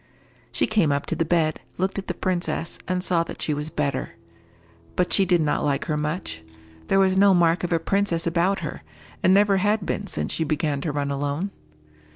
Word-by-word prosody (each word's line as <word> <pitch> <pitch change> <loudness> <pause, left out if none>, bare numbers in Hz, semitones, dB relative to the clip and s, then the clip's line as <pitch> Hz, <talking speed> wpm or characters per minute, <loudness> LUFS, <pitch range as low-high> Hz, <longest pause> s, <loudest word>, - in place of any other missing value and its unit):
She - - +1
came 205 -9 +2
up 140 0 0
to - - -2
the 165 - 0
bed, 160 -2 +1 0.2
looked 190 +2 -1
at 195 - -8
the - - -2
princess, 175 -2 -2
and 180 0 -1
saw 175 -3 +2
that - - -8
she 155 - -1
was 150 +1 -3
better. 140 -4 -2 0.8
But 180 - +1
she 195 - +4
did 175 -2 +3
not 150 -1 0
like 145 +5 0
her 155 -5 -1
much. 150 - -3 0.5
There - - +3
was 190 -1 +4
no 195 0 +6
mark 170 0 +3
of 175 - -2
a 165 - +4
princess 175 0 0
about 175 +4 +1
her, - - -5 0.4
and 185 - +4
never 200 0 +5
had 205 +1 +1
been 200 +2 -2
since - - -2
she 160 - 0
began 150 -2 -1
to 155 - -2
run 140 -1 -2
alone. 145 +7 -2
170 Hz, 205 wpm, -24 LUFS, 150-190 Hz, 0.8 s, no